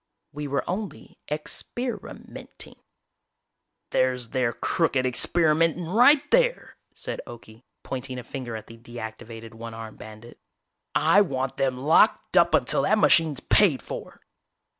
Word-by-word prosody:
"We 150 Hz, 0 st, -5 dB
were 140 Hz, 0 st, -2 dB
only 195 Hz, +3 st, -6 dB
ex 150 Hz, +1 st, -3 dB
per 245 Hz, -2 st, -4 dB
i -, -, -8 dB
ment -, -, -11 dB
ing -, -, -16 dB, 0.6 s
" -, -, -56 dB
"There's 125 Hz, -2 st, 0 dB
their 125 Hz, -2 st, 0 dB
crooked 130 Hz, +2 st, 0 dB
experimenting 165 Hz, +5 st, +2 dB
right 250 Hz, -, +4 dB
there!" -, -, +1 dB, 0.2 s
said -, -, -6 dB
Okie, 115 Hz, -1 st, -12 dB, 0.2 s
pointing 130 Hz, 0 st, -5 dB
a 125 Hz, -, -6 dB
finger 125 Hz, -4 st, -6 dB
at 110 Hz, -, -7 dB
the 115 Hz, 0 st, -14 dB
deactivated 115 Hz, -1 st, -9 dB
one 115 Hz, 0 st, -8 dB
armed 110 Hz, -1 st, -9 dB
bandit. 110 Hz, +2 st, -12 dB, 0.6 s
"I 205 Hz, -, +5 dB
want 135 Hz, -8 st, -2 dB
them 130 Hz, -2 st, 0 dB
locked 160 Hz, -, +3 dB
up 170 Hz, -2 st, +5 dB
until 130 Hz, -3 st, +1 dB
that 215 Hz, +10 st, +2 dB
machine's 160 Hz, -8 st, +3 dB
paid 165 Hz, -, +3 dB
for!" -, -, -8 dB
135 Hz, 145 wpm, -25 LUFS, 120-170 Hz, 0.6 s, I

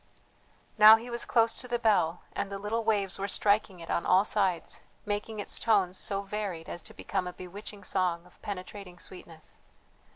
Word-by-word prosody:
Now 215 Hz, +1 st, +11 dB
he 235 Hz, +2 st, -6 dB
was 235 Hz, 0 st, -2 dB
close 230 Hz, -1 st, +3 dB
to 250 Hz, -, -4 dB
the 240 Hz, -1 st, 0 dB
bell, 200 Hz, -7 st, +2 dB
and 200 Hz, -, -3 dB
the 200 Hz, -, -3 dB
little 215 Hz, +3 st, -2 dB
waves 205 Hz, -4 st, 0 dB
were 200 Hz, -, -1 dB
striking 200 Hz, -2 st, +1 dB
it 165 Hz, -, -6 dB
on -, -, 0 dB
all 190 Hz, +2 st, +4 dB
sides, 190 Hz, -6 st, 0 dB, 0.2 s
making 210 Hz, +1 st, -3 dB
its 205 Hz, -, -3 dB
tones 195 Hz, -5 st, +2 dB
so 200 Hz, +1 st, -2 dB
varied 195 Hz, -5 st, -4 dB
as 175 Hz, -, -5 dB
to -, -, -10 dB
become 190 Hz, -2 st, -2 dB
a 180 Hz, -, -5 dB
bewitching 200 Hz, +3 st, -9 dB
song 180 Hz, -2 st, 0 dB
of 180 Hz, -, -21 dB
penetrating 190 Hz, -1 st, -7 dB
sweetness. 165 Hz, -4 st, -10 dB
200 Hz, 185 wpm, -29 LUFS, 180-215 Hz, 0.2 s, Now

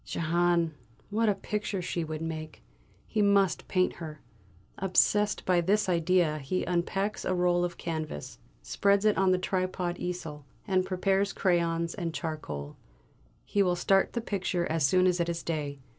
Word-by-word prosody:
Jehane! 170 Hz, 0 st, +1 dB, 0.4 s
what 220 Hz, +1 st, +2 dB
a 205 Hz, -, +2 dB
picture 210 Hz, 0 st, -3 dB
she 175 Hz, -1 st, -2 dB
would 155 Hz, 0 st, -5 dB
make! 155 Hz, -1 st, -6 dB, 0.4 s
He 215 Hz, -, -1 dB
must 200 Hz, -3 st, +3 dB
paint 185 Hz, -1 st, +1 dB
her! 155 Hz, -3 st, -7 dB, 0.6 s
Obsessed 205 Hz, +2 st, +2 dB
by 180 Hz, -2 st, +3 dB
this 200 Hz, +5 st, +2 dB
idea, 170 Hz, -3 st, +2 dB
he 145 Hz, +7 st, -2 dB
unpacks 195 Hz, +4 st, -1 dB
a 185 Hz, -, 0 dB
roll 175 Hz, 0 st, +2 dB
of 175 Hz, -1 st, -3 dB
canvas, 155 Hz, -, -5 dB, 0.2 s
spreads 200 Hz, +1 st, +2 dB
it 215 Hz, -, +4 dB
on 190 Hz, 0 st, +3 dB
the 185 Hz, -, +3 dB
tripod 185 Hz, -1 st, -2 dB
easel, 165 Hz, -5 st, -5 dB, 0.2 s
and 185 Hz, -2 st, +1 dB
prepares 195 Hz, +1 st, +1 dB
crayons 170 Hz, -2 st, +1 dB
and 170 Hz, -4 st, -4 dB
charcoal; 75 Hz, -, -5 dB, 0.7 s
he 205 Hz, -, +1 dB
will 180 Hz, -2 st, +2 dB
start 195 Hz, +2 st, +2 dB
the 235 Hz, -, -1 dB
picture 190 Hz, -5 st, -1 dB
as 160 Hz, -1 st, 0 dB
soon 185 Hz, +6 st, +4 dB
as 180 Hz, -1 st, +2 dB
it 170 Hz, 0 st, 0 dB
is 170 Hz, 0 st, -3 dB
day. 150 Hz, -4 st, -3 dB
180 Hz, 160 wpm, -29 LUFS, 165-195 Hz, 0.7 s, it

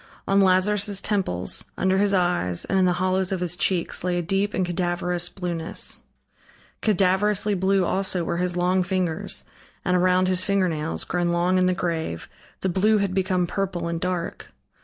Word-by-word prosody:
On 195 Hz, 0 st, +4 dB
Lazarus' 195 Hz, +2 st, +3 dB
temples, 190 Hz, -, -1 dB
under 190 Hz, +1 st, +2 dB
his 205 Hz, 0 st, +3 dB
eyes, 175 Hz, -, +1 dB
and 195 Hz, -, +1 dB
in 185 Hz, -, +4 dB
the 180 Hz, -, +3 dB
hollows 185 Hz, +1 st, 0 dB
of 190 Hz, -, -1 dB
his 175 Hz, -1 st, +1 dB
cheeks, 175 Hz, -1 st, 0 dB
lay 180 Hz, -1 st, 0 dB
a 175 Hz, -, -1 dB
deep 195 Hz, +4 st, 0 dB
and 185 Hz, -, +1 dB
cadaverous 175 Hz, 0 st, -1 dB
blueness; 175 Hz, -3 st, -2 dB, 0.8 s
cadaverously 205 Hz, +1 st, +2 dB
blue 190 Hz, 0 st, +2 dB
also 190 Hz, -1 st, 0 dB
were 170 Hz, -, -2 dB
his 180 Hz, 0 st, -1 dB
long 180 Hz, +1 st, +2 dB
fingers, 180 Hz, -3 st, -2 dB, 0.4 s
and 180 Hz, -, +2 dB
around 185 Hz, +1 st, +3 dB
his 185 Hz, 0 st, +2 dB
fingernails, 180 Hz, -6 st, 0 dB
grown 175 Hz, 0 st, -1 dB
long 175 Hz, +2 st, +2 dB
in 185 Hz, -, +3 dB
the 185 Hz, -, +1 dB
grave, 165 Hz, -, -3 dB, 0.3 s
the -, -, 0 dB
blue 205 Hz, +4 st, +3 dB
had 200 Hz, -2 st, 0 dB
become 185 Hz, -1 st, +1 dB
purple 180 Hz, -2 st, -3 dB
and 170 Hz, 0 st, -3 dB
dark. 180 Hz, -2 st, -3 dB
185 Hz, 170 wpm, -24 LUFS, 175-190 Hz, 0.8 s, On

